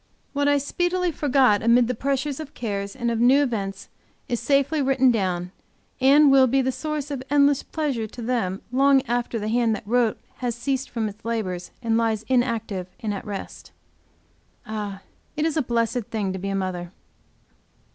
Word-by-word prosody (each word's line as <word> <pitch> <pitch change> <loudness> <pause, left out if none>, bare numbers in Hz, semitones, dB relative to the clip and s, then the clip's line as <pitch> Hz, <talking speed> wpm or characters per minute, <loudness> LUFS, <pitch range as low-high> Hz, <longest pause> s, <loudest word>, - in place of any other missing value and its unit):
What 285 0 +1
I 285 0 +4
speedily 350 +5 0
forgot 265 -8 +3
amid 235 +1 +4
the 250 - 0
pressure 275 +4 -1
of 300 -2 -10
cares 200 -3 -4
and 240 -2 -1
of 230 - -1
new 260 +4 +5
events 200 -7 -3 0.4
is 240 - -1
safely 280 +4 +2
written 265 -1 +4
down, 180 -5 -1 0.5
and 280 +2 +6
will 265 -1 +6
be 270 +3 +2
the 260 0 +1
source 300 +1 -4
of 275 -3 -3
endless 285 -1 +4
pleasure 275 -8 -2
to 240 - -10
them 225 -6 -1
long 270 +1 +4
after 240 -2 -1
the 210 -1 -3
hand 230 0 +2
that 215 - -9
wrote 235 0 +2 0.2
has 245 -2 -2
ceased 265 +2 -2
from 225 -2 -2
its 210 +1 -10
labors, 190 -6 -3
and 225 -1 +2
lies 220 -2 0
inactive 230 -7 0
and 215 -2 -2
at 195 - -6
rest. 200 -1 -7 0.9
Ah, 210 -3 -5 0.3
it 305 - +1
is 320 - 0
a 315 - +2
blessed 235 -1 -1
thing 205 -4 -2
to 190 - -5
be 195 +2 -4
a 195 - -1
mother! 180 -2 -3
240 Hz, 180 wpm, -24 LUFS, 215-275 Hz, 0.9 s, and